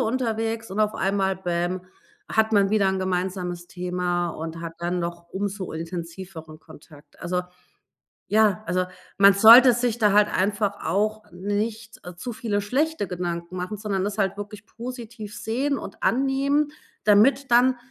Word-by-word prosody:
unterwegs 225 Hz, -2 st, -1 dB
und 200 Hz, +3 st, -2 dB
auf 215 Hz, 0 st, +1 dB
einmal, 195 Hz, -1 st, 0 dB
bäm, 175 Hz, 0 st, -2 dB, 0.4 s
hat 220 Hz, -7 st, +1 dB
man 200 Hz, -2 st, +4 dB
wieder 205 Hz, -2 st, +3 dB
'n 190 Hz, 0 st, 0 dB
gemeinsames 180 Hz, -1 st, -2 dB
Thema 180 Hz, -1 st, -2 dB
und 165 Hz, +1 st, -6 dB
hat 165 Hz, -1 st, -5 dB
dann 175 Hz, +1 st, -2 dB
noch 170 Hz, 0 st, -5 dB
umso 195 Hz, -1 st, -4 dB
intensiveren 165 Hz, -1 st, -7 dB
Kontakt. 155 Hz, -1 st, -17 dB
Also 180 Hz, +1 st, -1 dB, 0.9 s
ja, 210 Hz, -3 st, +3 dB
also 180 Hz, +2 st, 0 dB, 0.3 s
man 200 Hz, 0 st, +8 dB
sollte 235 Hz, +5 st, +9 dB
sich 240 Hz, -1 st, -1 dB
da 210 Hz, -2 st, +4 dB
halt 210 Hz, 0 st, +5 dB
einfach 205 Hz, +1 st, 0 dB
auch 215 Hz, +5 st, -1 dB
nicht 210 Hz, +4 st, -4 dB, 0.2 s
zu 240 Hz, +7 st, -5 dB
viele 215 Hz, -3 st, -2 dB
schlechte 265 Hz, +3 st, -1 dB
Gedanken 175 Hz, 0 st, -4 dB
machen, 185 Hz, +4 st, -4 dB
sondern 200 Hz, -2 st, -2 dB
das 205 Hz, +1 st, -3 dB
halt 195 Hz, -1 st, 0 dB
wirklich 205 Hz, 0 st, -8 dB
positiv 235 Hz, -3 st, -8 dB
sehen 275 Hz, +6 st, -1 dB
und -, -, -9 dB
annehmen, 275 Hz, +3 st, +1 dB, 0.3 s
damit 235 Hz, +6 st, +4 dB
dann 250 Hz, +2 st, +5 dB
200 Hz, 145 wpm, -24 LUFS, 180-225 Hz, 0.9 s, sollte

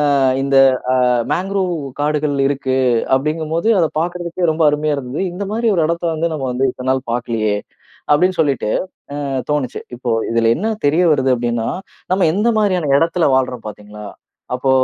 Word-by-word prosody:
அ -, -, +3 dB, 0.3 s
இந்த 140 Hz, 0 st, 0 dB, 0.4 s
அ -, -, +2 dB, 0.4 s
மாங்கரூவ் 190 Hz, 0 st, -1 dB, 0.3 s
காடுகள் 150 Hz, 0 st, 0 dB
இருக்கு 135 Hz, -2 st, -1 dB, 0.4 s
அப்படிங்கும்போது 155 Hz, +7 st, -1 dB
அதை 165 Hz, -, +3 dB
பார்க்கறதுக்கே 175 Hz, 0 st, -2 dB
ரொம்ப 160 Hz, +1 st, 0 dB
அருமையா 150 Hz, 0 st, 0 dB
இருந்தது. 130 Hz, +3 st, -4 dB
"இந்த 200 Hz, +3 st, -4 dB
மாதிரி 230 Hz, +2 st, 0 dB
ஒரு 165 Hz, -, +2 dB
இடத்த 170 Hz, +1 st, -2 dB
வந்து 165 Hz, +2 st, -1 dB
நம்ம 145 Hz, -4 st, -3 dB
வந்து 130 Hz, +2 st, +1 dB
இத்தன 125 Hz, +1 st, -5 dB
நாள் 130 Hz, -1 st, -2 dB
பார்க்கலையே?" 115 Hz, -3 st, -1 dB, 0.6 s
அப்படின்னு 180 Hz, +4 st, +3 dB
சொல்லிட்டு, 140 Hz, -8 st, 0 dB, 0.5 s
அ -, -, -3 dB, 0.3 s
தோணுச்சு. 145 Hz, -4 st, -2 dB
இப்போ 120 Hz, -1 st, -2 dB, 0.2 s
இதில 115 Hz, 0 st, +2 dB
என்ன 220 Hz, +6 st, -1 dB
தெரிய 160 Hz, +5 st, +3 dB
வருது 130 Hz, -2 st, +2 dB
அப்படின்னா, 120 Hz, -1 st, -1 dB, 0.4 s
நம்ம 185 Hz, -1 st, +3 dB
எந்த 210 Hz, +4 st, +1 dB
மாதிரியான 185 Hz, -8 st, +1 dB
இடத்தில 165 Hz, +2 st, +1 dB
வாழ்றோம் 125 Hz, -3 st, -2 dB
பார்த்தீங்களா? 105 Hz, 0 st, -10 dB, 0.5 s
அப்போ 130 Hz, +1 st, 0 dB
150 Hz, 160 wpm, -18 LUFS, 125-170 Hz, 0.6 s, அ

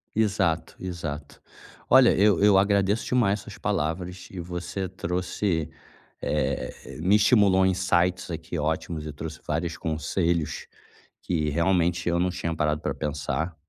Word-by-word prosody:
Exato, 95 Hz, -7 st, +1 dB
exato. 80 Hz, -5 st, -6 dB, 0.5 s
Olha, -, -, +7 dB
eu 100 Hz, -2 st, +4 dB
eu 105 Hz, -2 st, +6 dB
agradeço 100 Hz, +2 st, +2 dB
demais 110 Hz, -5 st, +2 dB
as -, -, -12 dB
suas -, -, -10 dB
palavras 90 Hz, -1 st, -2 dB
e 95 Hz, -, -7 dB
você 90 Hz, +2 st, -4 dB
trouxe 90 Hz, -2 st, -2 dB, 0.5 s
eh, 75 Hz, -4 st, -3 dB
me 95 Hz, +5 st, +4 dB
estimulou 100 Hz, -3 st, +5 dB
insights 90 Hz, -1 st, +1 dB
aqui 80 Hz, +1 st, -5 dB
ótimos 80 Hz, +1 st, -2 dB
e 75 Hz, -, -6 dB
trouxe 80 Hz, +2 st, -7 dB
vários 80 Hz, +2 st, -2 dB
conselhos 85 Hz, +1 st, -1 dB, 0.5 s
que, 80 Hz, -4 st, -1 dB
realmente, 90 Hz, +2 st, +1 dB
eu 85 Hz, 0 st, +1 dB
não 90 Hz, +1 st, +2 dB
tinha 85 Hz, -2 st, -3 dB
parado 75 Hz, -1 st, 0 dB
pra -, -, -2 dB
pensar 75 Hz, +3 st, -3 dB
90 Hz, 135 wpm, -26 LUFS, 80-95 Hz, 0.5 s, Olha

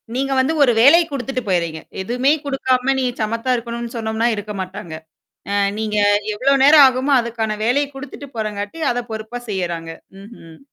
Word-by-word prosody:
நீங்க 270 Hz, +1 st, -1 dB
வந்து 275 Hz, +5 st, +1 dB
ஒரு 245 Hz, -, +4 dB
வேலை 320 Hz, +7 st, +7 dB
குடுத்துட்டு 265 Hz, -1 st, -3 dB
போயர்றீங்க. 170 Hz, -4 st, -1 dB, 0.2 s
எதுவுமே 250 Hz, +7 st, +1 dB
குடுக்காம 270 Hz, -1 st, +1 dB
நீ 255 Hz, -, 0 dB, 0.2 s
சமத்தா 230 Hz, +4 st, -1 dB
இருக்கணும்னு 235 Hz, 0 st, -5 dB
சொன்னோம்னா 220 Hz, +1 st, -1 dB
இருக்க 210 Hz, 0 st, -6 dB
மாட்டாங்க. 185 Hz, -3 st, -7 dB, 0.6 s
அ 200 Hz, -, -1 dB, 0.2 s
நீங்க 215 Hz, -1 st, -2 dB, 0.4 s
எவ்வளோ 265 Hz, +6 st, +1 dB
நேரம் 290 Hz, 0 st, +8 dB
ஆகுமோ, 260 Hz, +2 st, +1 dB
அதுக்கான 225 Hz, -2 st, -3 dB
வேலைய 280 Hz, +5 st, +2 dB
குடுத்துட்டு 285 Hz, +1 st, -9 dB
போறங்காட்டி, 210 Hz, +5 st, -4 dB
அத 245 Hz, 0 st, -3 dB
பொறுப்பா 220 Hz, +3 st, -6 dB
செய்யறாங்க. 170 Hz, -4 st, -3 dB, 0.3 s
ம்ஹ்ம். 185 Hz, -7 st, -14 dB
235 Hz, 150 wpm, -19 LUFS, 210-265 Hz, 0.6 s, நேரம்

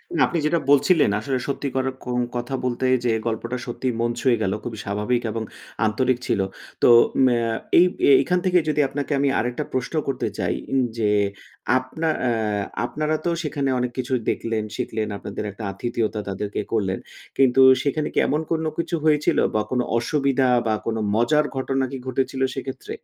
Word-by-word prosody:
না, -, -, +1 dB
আপনি 170 Hz, -, -2 dB
যেটা 165 Hz, +2 st, +2 dB
বলছিলেন 145 Hz, -, +4 dB
আসলে 130 Hz, +4 st, -2 dB
সত্যিকার 135 Hz, -1 st, -2 dB, 0.2 s
কোন 125 Hz, 0 st, -1 dB, 0.2 s
কথা 120 Hz, +2 st, -2 dB
বলতে 125 Hz, +1 st, -1 dB, 0.2 s
যে, -, -, +3 dB, 0.2 s
গল্পটা 115 Hz, +2 st, -2 dB
সত্যিই 120 Hz, +1 st, -2 dB
মন 120 Hz, 0 st, +1 dB
ছুঁয়ে 125 Hz, -4 st, +3 dB
গেল। 95 Hz, -2 st, 0 dB
খুবই 115 Hz, -3 st, -5 dB
স্বাভাবিক 105 Hz, +4 st, 0 dB
এবং 110 Hz, 0 st, -3 dB, 0.4 s
আন্তরিক 125 Hz, +3 st, +1 dB
ছিল। -, -, +1 dB, 0.4 s
তো -, -, +6 dB, 0.4 s
মে 125 Hz, -2 st, +4 dB
অ্যা 115 Hz, -, 0 dB, 0.3 s
এই, 180 Hz, -, +7 dB, 0.4 s
এখান 180 Hz, 0 st, +1 dB
থেকে 180 Hz, -1 st, +4 dB
যদি 150 Hz, 0 st, +2 dB
আপনাকে 145 Hz, +2 st, -4 dB
আমি 140 Hz, -, +2 dB
আরেকটা 120 Hz, +1 st, -2 dB
প্রশ্ন 130 Hz, +4 st, -2 dB
করতে 135 Hz, -2 st, -1 dB
চাই -, -, 0 dB, 0.4 s
যে, 105 Hz, -2 st, +1 dB, 0.7 s
আপনা 145 Hz, +6 st, -3 dB
অ্যা 110 Hz, -4 st, 0 dB, 0.2 s
আপনারা 155 Hz, +4 st, -1 dB
তো 175 Hz, -, +2 dB
সেখানে 140 Hz, -2 st, -1 dB
অনেক 125 Hz, 0 st, -1 dB
কিছু 130 Hz, +1 st, -2 dB, 0.2 s
দেখলেন, 110 Hz, -2 st, -1 dB
শিখলেন। 110 Hz, -1 st, -2 dB
আপনাদের 105 Hz, -, -6 dB
একটা 105 Hz, +2 st, -10 dB
আতিথিয়তা 110 Hz, +1 st, -2 dB
তাদেরকে 100 Hz, +1 st, -3 dB
করলেন। 95 Hz, -4 st, 0 dB, 0.4 s
কিন্তু 135 Hz, 0 st, +5 dB, 0.2 s
সেখানে 150 Hz, +1 st, 0 dB
কি -, -, +2 dB
এমন 150 Hz, +2 st, +1 dB
কোন 160 Hz, -1 st, +1 dB
কিছু 170 Hz, +1 st, -1 dB
হয়েছিল 150 Hz, -1 st, +3 dB, 0.2 s
বা 105 Hz, -, +3 dB
কোন 125 Hz, -, +1 dB, 0.2 s
অসুবিধা 135 Hz, 0 st, +1 dB, 0.2 s
বা 110 Hz, -, +2 dB
কোন 115 Hz, -, -1 dB, 0.2 s
মজার 150 Hz, +7 st, +3 dB
ঘটনা 135 Hz, 0 st, 0 dB
কি 135 Hz, -, -4 dB
ঘটেছিল 130 Hz, +1 st, -1 dB
সেক্ষেত্রে? 135 Hz, -1 st, -6 dB
130 Hz, 170 wpm, -23 LUFS, 115-140 Hz, 0.7 s, এই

